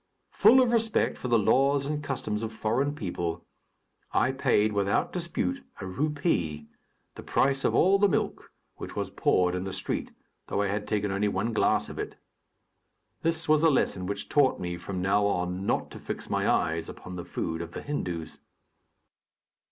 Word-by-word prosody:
Full 260 - +6
of 250 -2 +3
respect 225 -2 +2
for - - -4
the 120 -1 +4
laws 135 +6 +3
and 150 +1 -3
customs 115 -6 -3
of 110 -1 -3
foreign 120 +7 0
peoples, 85 - -3 0.7
I 130 - +3
paid, 120 -6 +2
without 100 0 +1
dispute, 165 - -2 0.2
a 95 - -5
rupee, 95 - -1 0.5
the - - -9
price 135 0 +1
of - - +2
all 195 +3 +5
the 205 0 +5
milk, 155 - -2 0.3
which - - -7
was - - -3
poured 90 -1 +2
in 90 0 -2
the 95 - -4
street, 95 0 -3 0.4
though 100 - 0
I 100 - 0
had 105 +1 -2
taken 105 -2 0
only 100 +2 +1
one 115 +3 -1
glass - - +2
of - - -8
it. - - -4 1.1
This 165 -1 0
was 155 0 +4
a 165 - +6
lesson 95 -9 +1
which 100 +1 -4
taught 145 -3 +3
me, 90 -1 -3
from 90 +1 -5
now 100 +2 +3
on, 90 0 -2
not - - 0
to - - -9
fix - - -6
my - - +1
eyes 80 0 +1
upon 90 - -9
the 90 - -5
food 80 -1 -3
of 85 0 -7
the - - -6
Hindus. 90 - -4
105 Hz, 180 wpm, -28 LUFS, 90-145 Hz, 1.1 s, Full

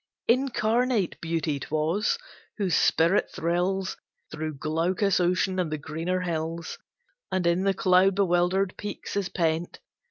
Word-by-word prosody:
Incarnate 240 -4 +1
Beauty 165 -3 -1
'twas, 160 - 0 0.4
whose 190 -6 +1
spirit 170 +5 +3
thrills 180 +3 -1 0.3
Through 155 0 -4
glaucous 170 +7 +1
ocean 185 +1 +1
and 170 -4 -1
the 155 - -1
greener 165 +5 -3
hills, 165 -1 -3 0.5
And 185 -2 0
in 170 +3 +2
the 195 -1 +2
cloud 185 +1 +4
bewildered 185 0 +1
peaks 205 -1 -6
is 200 -2 -1
pent. 165 -1 -1
180 Hz, 125 wpm, -26 LUFS, 165-195 Hz, 0.5 s, cloud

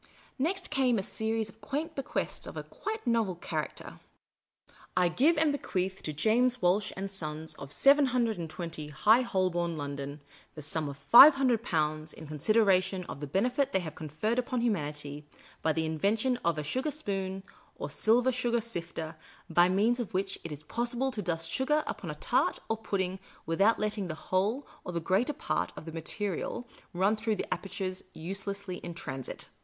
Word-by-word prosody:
Next 345 +7 -1
came 260 -5 +3
a 195 - -1
series 220 +2 -1
of 220 +1 -12
quaint 295 +8 -3
bequests 275 -3 -2
of - - -7
a - - -3
quite 440 -2 -5
novel 230 -6 +2
character. 160 -2 -5 0.5
" - - -20
I 180 -1 +4
give 300 - +3
and 305 -1 +4
bequeath 190 -9 -2
to 155 - -3
James 240 +10 +2
Walsh 200 +2 +2
and 195 0 -4
Sons, 155 -4 -5
of 140 - -8
720 220 - +2
High 210 - +4
Holborn, 180 -7 0
London, 140 0 -5 0.4
the 150 - -7
sum 155 0 -2
of 140 - -7
Five 270 - +10
Hundred 255 -5 +2
Pounds, 155 -5 -1
in 160 - -10
consideration 190 +4 +2
of 140 - -7
the 145 - -5
benefit 250 - +1
they 190 - +3
have 160 -3 -6
conferred 160 - -1
upon 250 -1 -1
humanity 150 -8 -2 0.3
by 160 - +2
the 160 +1 0
invention 215 - +1
of 170 -8 0
a 150 - -2
sugar 260 - -1
spoon 195 -9 -3 0.3
or - - -4
silver 245 +4 +3
sugar 240 -1 +1
sifter, 170 -7 -5 0.3
by 175 +2 +5
means 215 +6 +2
of 230 -6 -4
which 195 +1 -1
it 165 - -6
is 150 0 -7
possible 240 +6 -1
to 220 - -3
dust 165 -3 -2
sugar 300 - +1
upon - - -5
a - - -4
tart - - +1
or 225 - +1
pudding 190 -4 -2 0.3
without 195 +7 +3
let 215 0 0
ting 205 -3 -3
the 155 - -4
whole 205 - 0 0.2
or 180 - -5
the 170 - 0
greater 190 - +1
part 295 - -1
of - - -9
the 165 - -6
material 195 +7 -3 0.2
run 195 +4 +2
through 220 0 -1
the 185 - -1
apertures 185 0 -4
uselessly 195 +2 -3
in 175 -1 -7
transit. 135 -8 -6
195 Hz, 180 wpm, -30 LUFS, 165-235 Hz, 0.5 s, Five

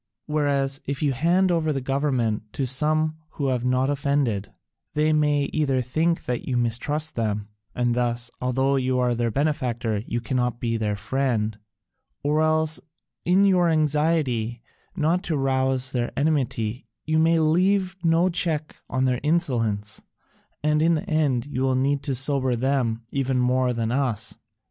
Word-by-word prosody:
Whereas, 140 -3 0
if 140 +2 -2
you 140 -2 +2
hand 175 +7 +2
over 160 -2 +1
the 140 - -1
government 130 -6 -1
to 135 - -1
some 155 +4 +1 0.2
who 140 -2 -1
have 125 -2 -1
not 125 +1 +2
offended, 140 -7 0 0.4
they 155 +1 +2
may 150 -1 +2
either 135 -4 +1
think 160 +7 0
that 125 -1 -3
you 125 - 0
mistrust 125 +7 0
them, 105 -2 -2 0.3
and 120 -1 +1
thus, 120 -1 0
although 130 +2 +1
you 130 -1 0
are 125 -1 +2
their 120 0 0
benefactor, 120 -5 -1
you 120 - -1
cannot 125 0 -1
be 115 -1 -1
their 105 -2 -1
friend, 110 -2 -1 0.6
or 150 +2 +2
else 155 0 +2 0.5
in 185 +3 +4
your 180 -3 +4
anxiety 150 -7 +1 0.3
not 170 +1 +1
to 160 - -1
rouse 130 -1 +1
their 120 -2 -1
enmity 130 -6 -1 0.2
you 155 0 +2
may 165 +1 +4
leave 185 +4 +2
no 165 +2 +3
check 160 -4 -2
on 130 0 0
their 125 -2 +1
insolence, 120 -10 0 0.6
and 150 0 +2
in 165 +1 +4
the 175 +6 -4
end 150 -8 +1
you 145 -3 -4
will 130 -1 +2
need 140 +2 +1
to 140 -3 -1
sober 130 -1 +2
them 120 -2 0
even 135 -1 0
more 125 0 +2
than 115 -1 -1
us." 115 -5 -1
135 Hz, 160 wpm, -24 LUFS, 120-155 Hz, 0.6 s, in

